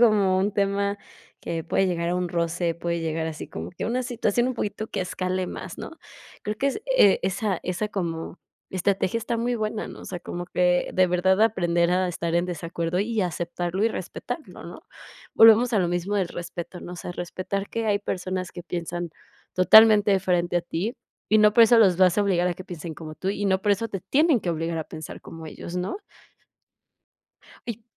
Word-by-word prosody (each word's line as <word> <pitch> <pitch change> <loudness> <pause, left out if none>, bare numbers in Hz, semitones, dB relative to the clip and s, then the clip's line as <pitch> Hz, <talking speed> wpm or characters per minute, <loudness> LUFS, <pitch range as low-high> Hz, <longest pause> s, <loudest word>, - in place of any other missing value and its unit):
como 205 -5 +4
un 195 +2 +1
tema 200 0 0 0.4
que 165 -1 -3
puede 195 +2 +1
llegar 170 -1 -1
a - - 0
un 180 -1 -1
roce, 170 0 -1
puede 170 0 -2
llegar 160 0 -2
así 155 - -7
como 80 +2 -6
que - - -6
a - - -1
una 250 +2 0
situación 240 0 0
un 255 - -2
poquito 215 0 -3
que - - -3
escale 185 0 -2
más, - - -7
¿no? - - -7 0.5
Creo 210 0 -2
que 275 - +1
es, 275 - -3 0.2
eh, 200 - +6
esa 190 0 -1
esa 185 +4 -2
como 170 -4 -4 0.3
estrategia 190 +3 0
está 230 +1 -2
muy 240 +1 0
buena, 215 -1 -2
¿no? - - -10
O - - -11
sea, 180 - -5
como 175 0 -6
que 180 0 +1
de 185 0 +4
verdad 190 +3 +2
aprender 175 -5 +2
a 185 0 +2
estar 170 -1 -3
en 175 +1 +2
desacuerdo, 170 0 -3
y 220 +2 0
aceptarlo 175 +3 -2
y - - +4
respetarlo, 245 - -6
¿no? - - -9 0.5
Volvemos 225 +2 +7
a 210 - +3
lo 180 - +2
mismo 175 +4 -1
del 185 -3 0
respeto, 175 +1 -7
¿no? 175 - -8
O - - -10
sea, 175 - -6
respetar 185 +3 -4
que 230 -1 -2
hay 205 -1 +2
personas 185 -2 -3
que 175 - -8
piensan 175 -1 -4 0.4
totalmente 210 +2 +7
diferente 175 -2 +1
a 175 - +1
ti, 195 +9 -3 0.3
y 215 - +5
no 210 0 +6
por 235 - +8
eso 230 +1 +5
los 190 -5 +5
vas 185 +1 +4
a - - +4
obligar 180 -3 +2
a 175 - -1
que 185 - -10
piensen 170 -2 -7
como 155 -1 -8
tú, 190 - -4
y 205 +1 -2
no 190 0 +1
por 210 - +2
eso 230 +3 -1
te 195 - -5
tienen 275 - +3
que 175 - -2
obligar 165 0 -2
a 155 - -3
pensar 155 -1 -9
como 165 -1 -10
ellos, 170 +3 -7
¿no? 180 - -2 1.7
Y 230 -1 -5
185 Hz, 210 wpm, -25 LUFS, 175-210 Hz, 1.7 s, por